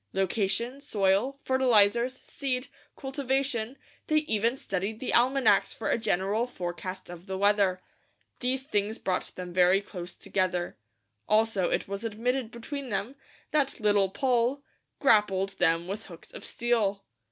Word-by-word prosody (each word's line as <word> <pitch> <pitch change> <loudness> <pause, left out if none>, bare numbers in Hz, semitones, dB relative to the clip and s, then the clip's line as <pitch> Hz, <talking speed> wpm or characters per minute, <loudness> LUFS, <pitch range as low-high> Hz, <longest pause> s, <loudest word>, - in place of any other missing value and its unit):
Location, 205 +7 0
soil, 210 +2 +1
fertilizers, 245 -1 +3
seed, 255 -2 -3 0.3
cultivation 270 -3 -1 0.3
they 310 - +1
even 230 +1 +1
studied 195 0 -3
the 255 - -3
almanacs 260 +2 +4
for - - -2
a - - +3
general 210 +3 0
forecast 185 -2 -6
of 175 +2 -10
the 190 0 -3
weather. 200 -2 +3 0.6
These 260 +1 -1
things 215 -5 -1
brought 185 -1 -2
them 180 -1 -7
very 180 +1 +5
close 180 -3 -8
together. 180 -2 -1 0.5
Also 215 -3 +3
it - - -1
was 200 +2 -5
admitted 235 +2 -1
between 260 +3 -6
them, 205 +4 -2 0.4
that 285 -4 +1
Little 205 -3 +3
Poll 250 +4 +1 0.4
"grappled 210 -7 +3
them 165 +1 +3
with 205 +3 -5
hooks 170 -3 -13
of - - -9
steel." 220 -5 0
215 Hz, 135 wpm, -28 LUFS, 190-255 Hz, 0.6 s, very